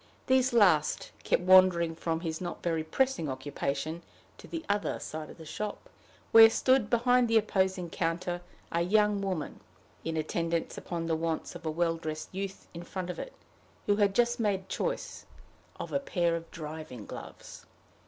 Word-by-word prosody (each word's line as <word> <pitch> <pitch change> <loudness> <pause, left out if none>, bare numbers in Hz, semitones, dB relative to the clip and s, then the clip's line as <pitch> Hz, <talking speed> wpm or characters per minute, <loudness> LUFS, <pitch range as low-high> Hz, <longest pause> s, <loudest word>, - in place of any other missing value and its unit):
These 260 -1 +3
last 185 -10 +3
kept - - +1
wandering 185 -3 +6
from 165 0 -2
his 160 -1 -4
not 175 -1 -5
very 165 -2 0
pressing 170 - 0
occupation 140 +4 -3 0.4
to - - -12
the 330 -1 -5
other 205 0 0
side 155 0 -6
of - - -12
the 160 - -11
shop, 210 - -6 0.4
where 225 0 +10
stood, 255 -1 +2
behind 245 +1 +3
the 225 0 +4
opposing 190 -4 +1
counter, 175 +1 -2 0.3
a 170 - +1
young 210 +2 +3
woman, 185 -6 -3 0.4
in 165 0 -2
attendance 165 +1 -1
upon 170 -2 -4
the 165 -1 +1
wants 165 0 -2
of 170 -2 -7
a - - +1
well 165 +1 0
dressed 155 -1 -5
youth 195 0 -5
in 170 - -7
front 180 +1 -5
of - - -8
it, - - -6 0.5
who 205 0 +2
had 200 -2 +2
just 240 0 +2
made 195 -4 0
choice - - -3 0.5
of - - -6
a 280 - +2
pair 175 -10 0
of 165 0 -6
driving 155 -8 -7
gloves. - - -10
175 Hz, 170 wpm, -30 LUFS, 165-210 Hz, 0.5 s, where